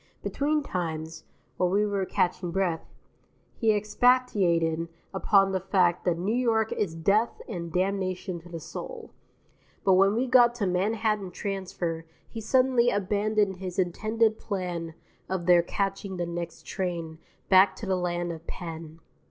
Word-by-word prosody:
Between 300 +1 0
times, 160 - -4 0.3
while 180 - +2
we 205 +3 +2
were 200 -2 -1
catching 180 0 0
breath, 175 -2 -1 0.6
he 225 -1 +2
expatiated 205 -7 +2 0.3
upon 195 0 +3
the 190 - 0
fact 180 -2 +1
that 175 -2 +2
New 190 +6 -1
York 225 -3 +1
is 170 -6 -1
death 200 +8 +1
and 170 -6 -5
damnation 185 0 -1
to 175 +1 -15
the 165 -1 -6
soul; 465 - -8 0.7
but 190 - +4
when 195 +2 +4
we 245 +3 +1
got 245 -2 +5
to 220 -4 -1
Manhattan 205 +2 0
Transfer 180 -4 -4 0.2
he 225 - -7
suddenly 255 +1 +3
abandoned 205 -1 +1
his 185 -1 -6
intended 215 +5 +1
plan 175 -5 -4 0.3
of 185 -2 -2
there 175 -1 +6
catching 195 +1 -3
the 175 - -1
next 170 -1 -6
train 170 -4 -4 0.3
back 190 0 +6
to 215 - -7
the 190 -1 +1
land 175 -1 -2
of 165 0 -9
Penn. 165 -2 -7
190 Hz, 145 wpm, -27 LUFS, 175-215 Hz, 0.7 s, there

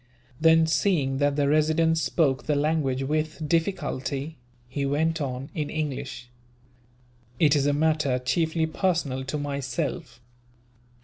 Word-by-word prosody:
Then, 160 0 +5
seeing 155 -5 +1
that 145 -1 +2
the 145 -1 +1
Resident 155 +2 +3
spoke 150 -4 0
the 150 - +2
language 145 -3 0
with 155 +2 -2
difficulty, 155 -4 -2 0.3
he 140 +3 -3
went 155 +4 0
on, 135 0 -4
in 150 -2 -3
English: 140 -4 -4 1.1
"It 150 -2 +5
is 140 -1 +2
a 145 - +2
matter 150 -3 +1
chiefly 160 +6 0
personal 160 -6 -1
to 135 +3 -3
myself." 140 +2 -4
150 Hz, 125 wpm, -26 LUFS, 135-160 Hz, 1.1 s, Then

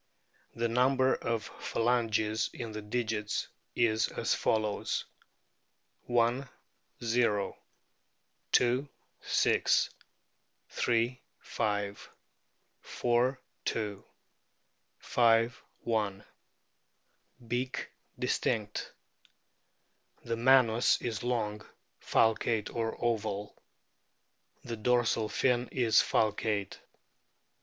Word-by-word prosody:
The 115 0 0
number 130 +2 +3
of 115 -2 -2 0.2
phalanges 110 -2 +1
in 115 -3 -5
the 110 0 -5
digits 105 -1 -2 0.3
is 110 -2 +2
as - - -1
follows: 110 -2 0 1.0
I, - - -5 0.9
o. 115 -4 +1 1.1
II, 130 +4 -1 0.3
6. - - +2 1.0
Ill, 120 +1 +2 0.2
5. 100 -1 -3 0.7
IV, 125 +2 +1 0.3
2. 105 -3 -2 1.0
V, - - -2
i. 115 -3 +1 1.3
Beak 125 +2 -2 0.3
distinct. 105 -2 -1 1.3
The 115 - -2
manus 120 -1 +4
is 115 -5 -3
long, 110 -4 -1 0.4
falcate, 110 -1 +1
or 115 -1 -1
oval. 105 -3 -2 1.1
The 115 -1 -5
dorsal 115 -1 +2
fin 125 +1 +1
is 120 -4 +1
falcate. 105 -2 0
115 Hz, 75 wpm, -31 LUFS, 105-120 Hz, 1.3 s, manus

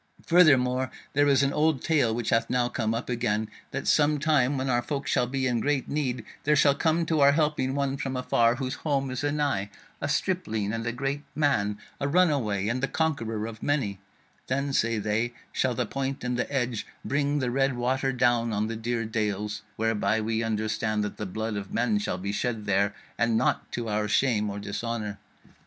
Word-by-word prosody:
Furthermore, 130 -7 +4 0.2
there 145 +1 +4
is 140 -1 +4
an 140 0 +1
old 150 -3 +2
tale 145 -8 +2
which 115 -1 -2
hath 115 0 +2
now 125 -1 +2
come 115 -2 -1
up 115 - -4
again, 110 -3 -1 0.2
That - - -4
some 150 0 +4
time 145 -3 +2
when 130 +1 -2
our 120 -2 +2
folk 140 +2 -3
shall 125 - +1
be 135 +1 -1
in 120 -2 +1
great 140 +1 0
need, 135 -4 -2 0.2
there 150 +1 +3
shall 140 0 +5
come 165 +3 +1
to 160 -1 +1
our 140 0 +6
helping 150 -4 +1
one 140 -1 0
from 135 -3 -3
afar, 120 -2 +3
whose 130 +1 -3
home 140 -3 0
is 130 +2 -3
anigh; 145 -9 0 0.3
a 145 - -1
stripling 140 - -1
and 115 0 -3
a - - +1
great 135 +4 -2
man; 105 -9 +1 0.2
a 140 - 0
runaway, 140 - +2
and 125 +3 -1
the 135 - +1
conqueror 115 -11 -1
of 115 -1 -8
many: 120 -10 0 0.5
then, 140 +2 -1
say 115 -3 +2
they, 110 +3 -1 0.2
shall 125 -2 0
the 125 - 0
point 135 +3 -3
and 125 0 -1
the 125 - -2
edge 125 -5 -1 0.2
bring 145 +1 +1
the 125 -4 0
red 135 0 +1
water 130 +2 0
down 120 -2 +2
on 105 0 0
the 115 +1 -3
dear 115 +1 -2
dales; 105 -1 -2
whereby 110 0 +1
we 110 +1 -1
understand 110 -1 -1
that 105 - -4
the 105 - -4
blood 110 +3 -3
of 100 -1 -5
men 115 -3 +2
shall 95 - -2
be 100 +2 -3
shed 110 0 -2
there, 100 0 +1 0.2
and 115 -1 +3
naught 125 - 0
to 120 -1 -3
our 105 0 0
shame 105 -2 +2
or 100 - -5
dishonour. 105 0 -4
125 Hz, 200 wpm, -27 LUFS, 110-140 Hz, 0.5 s, our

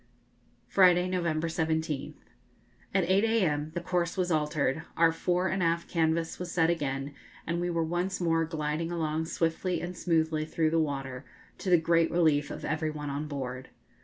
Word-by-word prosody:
Friday, 180 -2 +5
November 170 -3 0
17th. 160 -3 -2 0.8
At 190 -1 +2
8 190 +3 +3
a.m. 175 -10 +1
the 175 - -1
course 175 0 -1
was 180 -1 0
altered, 150 -1 0 0.2
our 165 0 +5
fore 180 +2 0
and 190 0 -1
aft 170 0 +1
canvas 165 0 0
was 180 -1 -5
set 165 -1 +3
again, 140 -3 -2 0.3
and 170 +1 -1
we 175 - -1
were 170 -1 0
once 175 +4 -1
more 165 -2 +2
gliding 160 +1 -2
along 160 -1 -1
swiftly 165 +3 -1
and 175 +1 -5
smoothly 160 -3 +1
through 155 0 0
the 165 - +2
water, 135 -4 -3 0.4
to 190 - -3
the 175 - +7
great 165 0 +3
relief 155 -4 +2
of - - -6
every 155 +1 -1
one 150 -2 -5
on 145 +2 -3
board. 130 -3 -5
165 Hz, 170 wpm, -29 LUFS, 155-175 Hz, 0.8 s, the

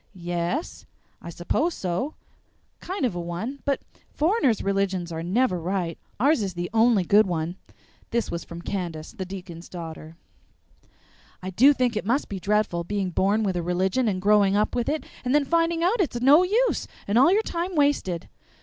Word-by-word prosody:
"Ye 175 -1 -6
es, 175 - -3 0.3
I - - -8
s'pose 290 - -1
so; 185 - -3 0.6
kind 370 -5 -3
of 235 - 0
a 175 - -4
one; 180 +11 -5
but 280 -1 0 0.3
foreigners' 305 - +1
religions 195 -3 -1
are 160 0 -4
never 185 +2 +1
right 175 -1 -2 0.2
ours 280 +2 +3
is 190 -3 -3
the 175 0 -4
only 225 -3 +4
good 205 +4 +4
one." 170 0 -2 0.5
This 235 0 -1
was 170 - -4
from 170 0 -9
Candace, 170 -6 -4
the 190 - -6
deacon's 180 -3 -9
daughter. 160 -2 -8 1.3
"I 185 - -4
do 260 +10 +6
think 250 -4 0
it 215 - -1
must 245 +8 0
be 195 - -4
dreadful, 205 -3 0
being 195 0 -2
born 200 +5 +2
with 190 -3 0
a 175 - 0
religion 185 +8 0
and 190 -3 0
growing 200 0 +4
up 210 +1 +1
with 240 +1 -1
it, 310 +1 -2 0.2
and 255 +2 +1
then 295 -1 +3
finding 335 +2 +1
out 400 +5 +2
it's 280 -9 -1
no 280 +7 +6
use 440 +7 +1 0.2
and 205 +4 +3
all 275 +7 +6
your 425 +3 +3
time 350 0 -3
wasted!" 285 - +1
200 Hz, 185 wpm, -25 LUFS, 175-275 Hz, 1.3 s, do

